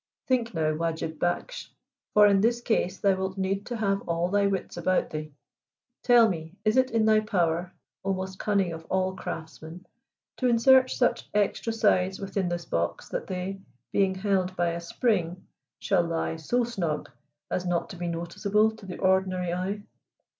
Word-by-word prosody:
Think 240 -5 0
now, 155 -1 +1
Wajib 160 -1 -3
Baksh, - - -2 0.5
for 210 0 +8
in 200 -1 +5
this 235 +2 +2
case 195 -5 0
thou 200 -1 +3
wilt 190 0 -3
need 195 +1 -1
to 245 - -3
have 200 -2 0
all 170 +1 0
thy 200 +1 +3
wits 195 -2 -3
about 180 +2 0
thee. 155 0 -5 0.7
Tell 240 -2 +6
me, 165 -3 -4
is 215 - +3
it 260 0 +4
in 225 -1 +2
thy 215 0 +5
power, 175 -4 0 0.3
oh 195 0 0
most 190 0 -6
cunning 195 -5 +1
of 165 0 -8
all 190 +1 0
craftsmen, 165 0 -7 0.5
to 255 - +1
insert 255 +2 +5
such 245 - 0
extra 210 +2 +1
sides 190 -4 +2
within 195 -2 -2
this 175 -1 -3
box 85 - -2
that - - -4
they, 190 +1 -4 0.3
being 195 -1 +2
held 185 -2 0
by 175 -1 +1
a 170 0 -3
spring, 180 -2 -1 0.3
shall 190 -3 +2
lie 165 -1 -2
so 240 +11 0
snug 180 -10 -3 0.4
as 180 0 -1
not 175 -1 0
to - - -8
be 175 0 -4
noticeable 195 +6 +1
to 200 - -12
the 180 - -6
ordinary 185 -2 +1
eye? 195 +3 -3
190 Hz, 175 wpm, -27 LUFS, 175-210 Hz, 0.7 s, for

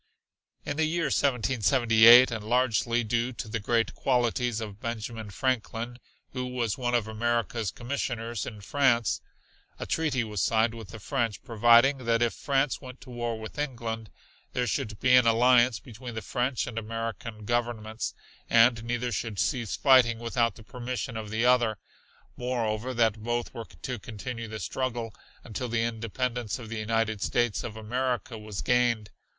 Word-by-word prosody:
In 145 - -3
the 160 - +3
year 160 -2 0
1778, 120 -1 +5
and 110 -2 -4
largely 120 0 +1
due 120 +3 0
to 110 - -6
the 115 +1 -3
great 115 +2 +1
qualities 120 -2 +1
of 105 -2 -7
Benjamin 115 -1 -5
Franklin, 120 +1 -2 0.3
who 125 -1 -3
was 120 -5 -1
one 120 -1 -1
of 115 -3 +1
America's 115 -1 -1
commissioners 120 -3 -3
in 105 -4 -8
France, 120 -1 +2 0.6
a - - -4
treaty 150 -6 0
was 105 -3 -3
signed 115 0 +2
with 110 -4 -9
the 110 - -9
French 115 -1 -2
providing 120 +4 +5
that 115 0 +3
if 120 - +1
France 135 -1 0
went 130 -1 -10
to 130 - -12
war 120 -2 -3
with 110 +6 -8
England, 115 -6 -4 0.4
there 125 - 0
should 110 -5 -2
be 125 0 +5
an 125 -2 +6
alliance 120 0 +5
between 120 0 -9
the 110 - -4
French 125 +1 -1
and 115 -2 -4
American 115 -1 -5
Governments, 115 -1 -2 0.3
and 115 0 +5
neither 120 +1 -2
should 110 0 -3
cease 120 0 0
fighting 130 -4 +5
without 115 0 0
the 110 - -13
permission 125 +1 -5
of 110 -1 -5
the 110 +3 0
other 120 -4 +3 0.6
moreover 120 -1 -2
that 110 -2 +2
both 120 +1 -2
were 115 - -6 0.2
to 125 -3 -3
continue 115 +3 -6
the 110 0 -6
struggle 120 +1 -3 0.3
until 120 +2 -5
the 115 0 +1
independence 115 0 -2
of 115 -4 -9
the 115 -1 -4
United 110 -1 0
States 120 -1 0
of 110 -2 -6
America 120 +1 -2
was 105 -2 -6
gained. 120 -4 +2
115 Hz, 160 wpm, -28 LUFS, 110-125 Hz, 0.6 s, an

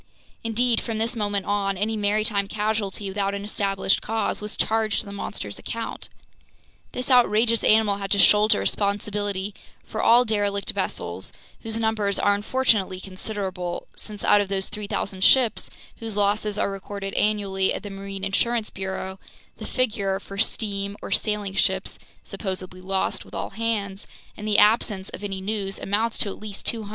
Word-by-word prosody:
Indeed, 230 +1 +2
from 225 -2 -3
this 230 +3 0
moment 205 -3 -1
on, 200 -1 0
any 215 +3 0
maritime 210 -1 +1
casualty 210 -1 -1
without 200 0 -1
an 200 - -5
established 195 -2 +1
cause 220 -1 -1
was 210 0 -1
charged 220 -1 +1
to - - -12
the 200 - -8
monster's 105 - -4
account. 230 0 -5 0.8
This 250 +1 -3
outrageous 230 -2 +4
animal 215 -2 +4
had 195 -1 -4
to 205 - +3
shoulder 210 +1 +6
responsibility 205 -1 -1 0.3
for - - -4
all 240 +2 +6
derelict 205 -2 0
vessels, - - -2 0.3
whose 225 -1 -3
numbers 220 -3 +1
are 205 - +3
unfortunately 205 -3 +1
considerable, 185 -2 -4
since 210 -2 -4
out 205 - +6
of 200 - -2
those 190 0 -1
3,000 200 -2 -2
ships 250 -1 +4 0.3
whose 225 -3 -4
losses 205 +1 +2
are 200 - 0
recorded 195 0 -6
annually 200 -2 +1
at - - -3
the 205 - -6
marine 195 0 -7
insurance 220 +3 0
bureau, 190 0 -5 0.4
the - - -7
figure 200 -6 0
for 195 0 -9
steam 200 -2 -1
or - - -6
sailing 210 -2 0
ships 195 - +1 0.2
supposedly 185 -2 -2
lost 190 +1 -1
with - - -12
all - - -3
hands, 210 -4 -2 0.3
in 210 - -8
the 210 -1 +2
absence 210 -3 +3
of 200 - -8
any 195 -2 -3
news, 195 -1 -3
amounts 220 +3 0
to - - +2
at 195 - -5
least 210 -2 -7
200! 220 -3 +1
205 Hz, 165 wpm, -24 LUFS, 195-220 Hz, 0.8 s, shoulder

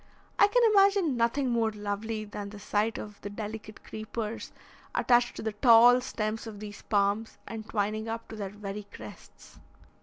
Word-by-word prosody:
I 405 - +8
can - - +3
imagine 395 -7 +4
nothing 240 +3 +1
more 230 -2 +2
lovely 210 +1 -4
than 205 -1 -6
the 210 - -10
sight 210 +2 -1
of 210 -1 -8
the 205 - -5
delicate 215 +1 -7
creepers 220 0 -5 0.4
attached 240 -1 +3
to - - -6
the 220 - -1
tall 240 +3 +7
stems 220 -3 -3
of 210 -2 -8
these 205 -1 -8
palms 205 +1 0
and 220 -1 -7
twining 215 +1 -1
up 225 0 -5
to 225 - -7
their 200 -3 -4
very 205 0 -7
crests. - - -13
220 Hz, 170 wpm, -29 LUFS, 210-235 Hz, 0.4 s, I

